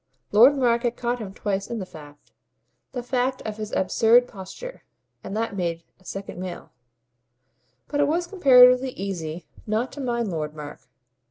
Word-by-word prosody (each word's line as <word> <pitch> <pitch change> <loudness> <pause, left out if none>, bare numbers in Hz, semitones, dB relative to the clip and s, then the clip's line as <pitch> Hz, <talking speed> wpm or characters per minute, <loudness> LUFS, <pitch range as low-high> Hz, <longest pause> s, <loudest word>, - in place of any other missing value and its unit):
Lord 245 +7 +7
Mark 235 -3 +2
had 240 -1 -1
caught 245 +1 -1
him 205 -4 -6
twice 195 0 -3
in 235 - -3
the 195 - -4
fact 145 -4 -14 0.6
the 245 -2 -5
fact 255 +1 -1
of 215 -1 -5
his 215 -1 -5
absurd 225 +6 +4
posture; 225 - -9 0.4
and 205 - -5
that 225 -2 -2
made 170 -3 -2 0.2
a 185 - -25
second 195 -1 -7
male. 185 -1 -7 1.2
But 290 - -2
it 290 - +4
was 340 +4 0
comparatively 255 -8 +6
easy 175 -4 -5 0.2
not 220 +4 -1
to 285 - -7
mind 235 -5 -1
Lord 155 -2 -4
Mark. 150 -1 -8
225 Hz, 165 wpm, -24 LUFS, 185-250 Hz, 1.2 s, Lord